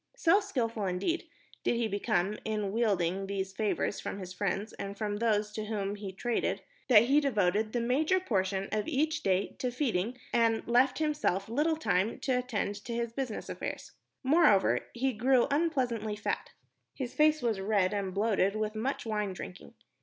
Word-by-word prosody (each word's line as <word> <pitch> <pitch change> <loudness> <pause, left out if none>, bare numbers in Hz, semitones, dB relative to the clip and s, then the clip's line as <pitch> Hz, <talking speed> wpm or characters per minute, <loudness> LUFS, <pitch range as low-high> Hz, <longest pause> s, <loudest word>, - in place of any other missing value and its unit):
So 390 -5 +4
skilful, 230 - -2
indeed, 200 - -1 0.4
did - - +2
he 235 -1 +1
become 205 -1 0
in 210 -2 -2
wheedling 195 -4 +1
these 190 -1 -3
favors 210 0 -1
from - - -5
his 185 -2 -7
friends 200 +2 -2
and 200 0 -6
from 205 -1 -2
those 210 -2 0
with 215 -1 -4
whom 205 -2 -2
he 205 -2 -6
traded, 235 +5 -1 0.2
that 230 -5 +8
he 275 +5 +4
devoted 215 -5 +1
the 240 - 0
major 300 +10 +2
portion 195 - -1
of 215 0 -1
each 310 +1 0
day 190 0 0
to 255 -3 0
feeding 245 -3 -1 0.2
and 230 -1 +2
left 250 +2 +3
himself 295 - 0
little 300 +8 +1
time 200 - +1
to 255 -2 +1
attend 205 -4 -3
to 235 - -4
his 235 -1 -2
business 255 -4 -4
affairs. - - -5 0.3
Moreover, 270 - +4
he 260 +2 0
grew 245 +3 +3
unpleasantly 255 -9 0
fat. 210 - -3 0.5
His 255 -3 -4
face 305 -2 +3
was 225 -4 +1
red 200 -1 +2
and 200 -2 -2
bloated 200 0 +1
with 215 0 -1
much 240 +5 -2
wine 210 -3 -1
drinking. 180 0 -9
220 Hz, 170 wpm, -30 LUFS, 200-255 Hz, 0.5 s, that